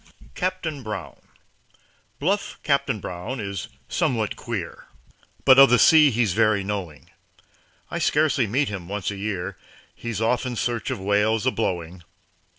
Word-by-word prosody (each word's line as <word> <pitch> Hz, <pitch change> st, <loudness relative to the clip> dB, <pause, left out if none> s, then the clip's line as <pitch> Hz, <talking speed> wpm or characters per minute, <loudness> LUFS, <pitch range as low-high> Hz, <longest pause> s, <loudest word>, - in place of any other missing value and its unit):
CAPTAIN 180 Hz, -6 st, -3 dB
BROWN 105 Hz, -6 st, -7 dB, 1.0 s
Bluff 195 Hz, +7 st, -1 dB
Captain 140 Hz, -6 st, +1 dB
Brown 90 Hz, +8 st, -5 dB
is 100 Hz, -3 st, -4 dB, 0.2 s
somewhat 110 Hz, -4 st, 0 dB
queer, 110 Hz, -9 st, -6 dB, 0.6 s
But 130 Hz, 0 st, +8 dB
of 135 Hz, -, +9 dB
the 125 Hz, -, +5 dB
sea 155 Hz, +5 st, +7 dB
he's 115 Hz, -5 st, +1 dB
very 110 Hz, -1 st, +2 dB
knowing. 95 Hz, -7 st, -5 dB, 0.8 s
I -, -, -2 dB
scarcely -, -, +2 dB
meet 135 Hz, +7 st, +1 dB
him 95 Hz, -4 st, -6 dB
once 105 Hz, 0 st, -2 dB
a -, -, -5 dB
year 100 Hz, -2 st, -4 dB, 0.3 s
He's 115 Hz, -3 st, -5 dB
off 115 Hz, +2 st, +1 dB
in 125 Hz, -2 st, -4 dB
search 120 Hz, +1 st, -2 dB
of 130 Hz, -5 st, -3 dB
whales 105 Hz, +3 st, +1 dB
a 130 Hz, -, +3 dB
blowing. 90 Hz, -6 st, -3 dB
110 Hz, 145 wpm, -24 LUFS, 100-130 Hz, 1.0 s, of